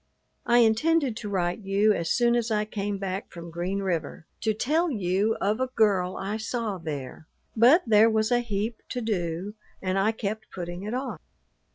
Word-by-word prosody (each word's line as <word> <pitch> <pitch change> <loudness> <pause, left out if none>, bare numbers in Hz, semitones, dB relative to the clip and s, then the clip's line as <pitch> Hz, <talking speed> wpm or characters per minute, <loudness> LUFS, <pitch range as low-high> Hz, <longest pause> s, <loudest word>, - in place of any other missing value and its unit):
I 240 0 +6
intended 255 +4 +3
to 210 - -5
write 180 -1 -1
you 205 +1 +2
as 165 -4 -2
soon 240 -1 +3
as 235 -1 0
I 210 -1 +1
came 205 -1 -3
back 195 0 -4
from 170 -1 -9
Green 180 +4 -2
River, 175 -3 -3
to 220 - +1
tell 310 +11 +1
you 205 - +1
of 210 +4 0
a 260 - +1
girl 190 -5 +2
I 200 +3 -3
saw 220 -3 -3
there; 150 -2 -6 0.3
but 250 +10 +6
there 220 0 +6
was 220 +1 +1
a 245 - +4
heap 220 -1 -3
to 250 - -3
do 185 -3 -2 0.3
and 185 0 -1
I 210 +3 +3
kept 220 0 -4
putting 175 -1 -6
it 210 +4 -4
off. 250 - -4
210 Hz, 185 wpm, -26 LUFS, 185-230 Hz, 0.3 s, I